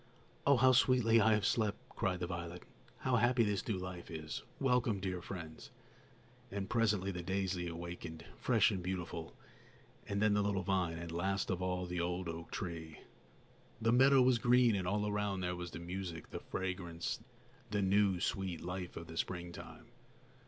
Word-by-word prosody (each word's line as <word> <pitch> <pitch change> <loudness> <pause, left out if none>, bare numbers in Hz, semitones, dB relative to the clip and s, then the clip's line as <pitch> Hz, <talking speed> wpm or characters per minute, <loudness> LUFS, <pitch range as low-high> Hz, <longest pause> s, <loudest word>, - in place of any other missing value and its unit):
"Oh, 140 -2 +7
how 130 +1 +6
sweetly 125 -3 +5
I 110 +1 +5
have 105 -2 +2
slept!" 105 -3 +1
cried 90 -1 -1
the - - +1
violet; 85 0 -5 0.4
"how 130 -1 +2
happy 120 +1 +4
this 105 -3 -1
new 105 - 0
life 90 -1 -6
is! 80 -2 -5 0.2
Welcome, 125 -6 +2
dear 95 -2 -3
friends!" 85 -4 -7 0.8
And 100 -1 -3
presently 105 -4 +2
the 90 -2 -4
daisy 95 -1 -1
awakened, 85 -1 -6
fresh - - +3
and 95 - -2
beautiful, 90 -2 -4 0.7
and 100 - -1
then 105 0 +4
the 105 - +3
little 100 -2 0
vine, 90 -3 0
and, 85 0 -6
last 95 +4 0
of 90 -1 -1
all, 90 0 -1
the 90 -1 -2
old 90 +1 -2
oak 85 0 -5
tree. 80 -4 -5 0.8
The 115 0 +2
meadow 135 +1 +7
was 125 -2 +4
green, 125 0 +5
and 95 -2 -1
all 105 +2 +1
around 105 -2 -1
there 90 0 -1
were 90 0 -5
the - - -7
music, 85 -1 -5
the - - -4
fragrance, 90 -3 -3 0.5
the 105 -1 0
new, 95 -1 +3
sweet 95 -1 -2
life 90 0 -5
of 85 - -6
the 80 0 -9
springtime. 85 -1 -5
95 Hz, 175 wpm, -35 LUFS, 85-105 Hz, 0.8 s, Oh